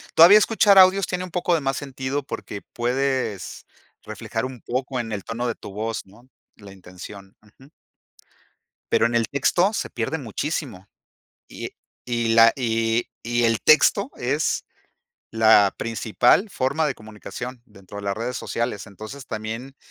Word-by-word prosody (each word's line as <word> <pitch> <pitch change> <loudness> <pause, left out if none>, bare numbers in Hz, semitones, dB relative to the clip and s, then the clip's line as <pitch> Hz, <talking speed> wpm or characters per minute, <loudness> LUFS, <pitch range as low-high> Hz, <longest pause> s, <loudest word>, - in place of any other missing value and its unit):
Todavía 175 +6 +9
escuchar 210 -2 +4
audios 190 +1 +7
tiene 180 0 -3
un 180 - -12
poco 175 0 0
de 160 - -1
más 135 0 -1
sentido 135 0 -4
porque 105 -6 -7
puedes 125 -5 -2 0.4
reflejar 110 +2 -4
un 130 -3 -8
poco 130 +1 -3
en 115 -2 -4
el 100 -3 -4
tono 115 +2 -4
de 115 - -2
tu - - -10
voz, 110 +2 -4
¿no? 115 +7 -20 0.3
La 100 -2 -13
intención. 95 +1 -12
Ujú. 110 +6 -21 1.2
Pero - - +4
en 120 0 0
el 115 -2 +2
texto 175 +8 +1
se - - -3
pierde 120 +7 -3
muchísimo. 125 - -4 0.6
Y - - -7 0.4
y 120 -2 0
la 115 0 +7
y 115 -2 0
y 120 +1 0
el 115 -1 +2
texto 200 - +4
es 135 +5 -1 0.7
la 110 -3 +5
principal 115 - +2
forma 140 0 0
de 135 - -2
comunicación 110 +4 -9
dentro 100 -3 -13
de 100 - -7
las 100 0 -2
redes 120 +3 -4
sociales. 120 -3 -3
Entonces, 110 +7 -10
también, 115 +4 -6
120 Hz, 155 wpm, -23 LUFS, 110-140 Hz, 1.2 s, Todavía